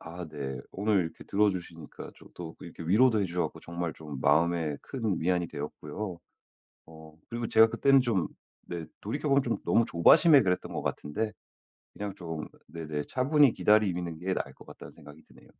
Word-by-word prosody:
아 85 0 -8
네. 70 -3 -5
오늘 100 0 +1
이렇게 80 - -9
들어주시니까 90 -6 -2
저도 80 -2 -10
이렇게 85 -1 -9
위로도 110 +7 +4
해 100 - +1
주셔 90 0 -2
가지고 - - -13
정말 85 -1 -4
좀 75 -3 -8
마음에 80 -2 +2
큰 115 -8 -2
위안이 90 +1 +1
되었고요. 85 +5 -6 0.7
어 80 -1 -14
그리고 120 0 -3
제가 110 0 +6
그때는 135 +4 +4
좀 110 -10 0 0.4
네 85 -2 -5 0.2
돌이켜보면 140 +5 +1
좀 120 -3 -1
너무 115 - +4
조바심에 140 - +6
그랬던 90 -5 -1
것 - - -3
같은데 105 +9 -3 0.6
그냥 100 -1 -5
좀 80 -4 -6 0.2
네네 80 -3 -4
차분히 140 0 +4
기다리는 90 -7 +2
게 95 +2 -1
나을 - - -3
것 - - -16
같다는 - - -12
생각이 75 +2 -15
드네요. - - -20
90 Hz, 370 characters per minute, -29 LUFS, 80-110 Hz, 0.7 s, 제가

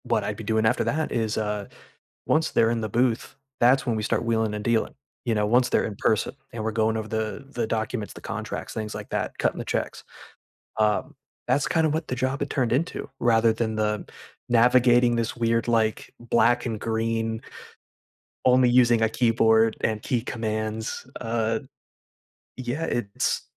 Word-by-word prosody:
What - - +1
I'd 105 - -3
be 115 - -7
doing 110 +1 +1
after 110 - +2
that 155 +1 -1
is, 110 -2 -1
uh 105 -2 -2 0.6
once 160 +1 +2
they're 115 - +3
in 115 -1 -1
the 110 - -3
booth, 120 +1 0 0.3
that's 135 +3 +5
when 120 -3 0
we 110 - -2
start 115 - 0
wheeling 110 -2 +1
and 105 0 -4
dealing, 115 0 +1 0.3
you 120 - +1
know? 105 0 +2
Once 125 +3 +3
they're - - +2
in 105 - -5
person, 110 -1 +1 0.2
and 115 - -4
we're 110 - -1
going 110 0 +1
over 110 -1 -4
the 110 +4 -3
the 120 -4 -2
documents, 110 -1 -3
the - - -11
contracts, - - -5
things 110 -1 -4
like - - -7
that - - -3
cutting - - 0
the - - -4
checks. - - -3 0.7
Um, 105 -1 +1 0.3
that's, 135 +3 +2
kind 160 -1 +2
of 150 - -1
what 160 0 -3
the 125 - -2
job 130 +2 -1
had 145 - -1
turned 125 -4 0
into, 145 +2 -2
rather 115 -1 +4
than 110 -1 -2
the 105 0 -1 0.4
navigating 120 0 +5
this 115 -1 -1
weird, 115 -1 +1
like, 110 -2 0
black 120 +1 +2
and 110 -2 -3
green 115 0 -1 1.0
only 125 0 +5
using 120 -2 +4
a 110 - +3
keyboard, 115 -1 +3
and 110 -1 0
key 120 +1 0
commands, 110 0 -3
uh, 115 0 -1 1.0
yeah, 130 +5 -3
it's 110 -9 -1
115 Hz, 180 wpm, -25 LUFS, 110-120 Hz, 1.0 s, that's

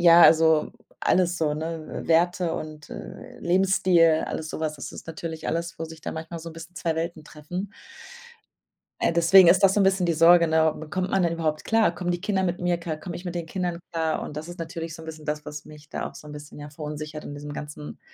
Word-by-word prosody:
ja, 170 0 +8
also 160 -1 +6 0.3
alles 180 -1 +2
so, 150 -2 +1
ne 160 +1 -5
Werte 175 +1 +2
und, 155 -1 -7
äh, - - -9
Lebensstil, 175 -3 +4
alles 155 - -4
so - - -5
was. 155 -1 -2
Das 135 - -7
ist - - -10
natürlich 160 0 -5
alles, 170 0 -2
wo 165 - -3
sich 160 0 -11
da - - -5
manchmal 160 +1 -6
so 165 +1 -7
'n - - -11
bisschen 165 +2 -11
2 165 -1 -1
Welten 165 -1 -3
treffen. 180 +7 -6 1.3
Äh, - - +2
deswegen 170 +3 +7
ist 185 +3 +5
das 195 -1 +6
so 210 - +3
'n 195 - +5
bisschen 190 -2 +3
die 170 - +2
Sorge, 170 +1 +6
ne? 160 -1 +3 0.2
Kommt 185 +2 -1
man 195 - +2
denn 170 -1 +2
überhaupt 155 -2 -2
klar? 225 -6 +3
Kommen 175 0 -2
die 175 0 -1
Kinder 195 -1 0
mit 175 -1 -1
mir 175 -1 +1
klar? 165 -2 -4
Komm 170 +3 -7
ich 175 - -7
mit 175 -1 -4
den 170 -1 -3
Kindern 175 0 -2
klar? 160 -1 0
Und 150 - -7
das 155 +2 -5
ist 175 - -9
natürlich 165 -1 -5
so 160 - -10
'n - - -10
bisschen 155 -1 -8
das, 150 0 -3
was 150 -1 -7
mich 150 -1 -14
da - - -4
auch - - -21
so - - -12
'n 150 - -9
bisschen, 150 0 -10
ja, 145 0 -8
verunsichert 150 0 -6
in - - -7
diesem 145 0 -7
ganzen 150 0 -8
165 Hz, 240 wpm, -25 LUFS, 155-175 Hz, 1.3 s, ja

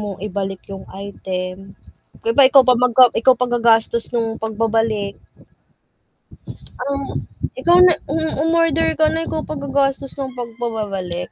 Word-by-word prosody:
mong 205 -3 -6
ibalik 195 -1 -4
yung 195 - -8 0.2
item, 185 -2 -5 0.7
'di 460 - -1
ba - - +9
ikaw 270 -1 +7
pa 250 - +7
mag 245 -2 +1
a - - +10
ikaw 260 +2 +5
pa 250 - +2
gagastos 235 0 +2
nung 225 -2 -1
pagbabalik. 220 -2 -1 1.7
Oh, 280 -1 -4 0.4
ikaw 345 +1 +4
na 360 - +6 0.2
mm, 320 +2 -1
umorder 325 -1 +2
ka 310 - +5
na, 325 0 -1
ikaw 315 - -3
pa 310 - -5
gagastos 275 -1 -1
ng 265 -2 -4
pagbabalik? 220 -7 -5
235 Hz, 145 wpm, -19 LUFS, 210-280 Hz, 1.7 s, a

